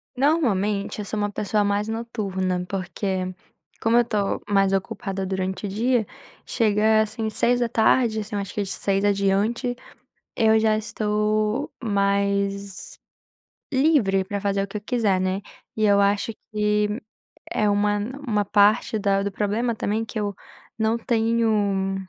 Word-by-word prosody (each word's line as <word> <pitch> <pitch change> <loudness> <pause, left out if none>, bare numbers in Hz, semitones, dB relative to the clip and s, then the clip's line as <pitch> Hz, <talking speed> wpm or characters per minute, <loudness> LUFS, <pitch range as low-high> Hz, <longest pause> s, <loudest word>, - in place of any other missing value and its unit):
Normalmente, 215 - +1
eu 210 - -4
sou 215 +1 -4
uma 205 0 -1
pessoa 210 +1 0
mais 205 +1 0
noturna, 195 -6 -2
porque, 185 0 -3 0.5
como 225 +1 +3
eu 240 - +4
tô 205 -3 -1
mais 195 -1 +3
ocupada 195 -1 -2
durante 190 +1 -3
o - - -3
dia, 230 +3 +1 0.4
chega 215 -1 +3
assim, 220 0 -2
18h, 235 -1 +2
assim, 210 0 -5
eu - - 0
acho 195 - -7
que 210 - -1
de 195 - -4
18h 195 0 0
adiante, 205 +5 +1 0.6
eu 220 -1 +4
já 220 -1 +3
estou 215 +3 -1
mais 200 - -1 0.8
livre 260 -10 +3
pra 200 +1 -4
fazer 200 0 0
o 200 - -2
que 205 - -5
eu 205 - -7
quiser, 210 -5 +1
né. 185 +1 -1 0.3
E 215 - +1
eu 200 -1 +4
acho 200 +2 +2 0.2
que 210 +1 +1 0.5
é 210 - +2
uma 205 0 +2
n 210 +4 -4 0.2
uma 210 -3 +1
parte 210 +3 +3
da 195 -1 +1
do 200 0 -2
problema 215 +4 -1
também, 215 +1 -1
que 225 0 -5
eu 205 -1 -2 0.4
não 220 +1 +2
tenho 220 -4 +1
210 Hz, 150 wpm, -24 LUFS, 200-220 Hz, 0.8 s, eu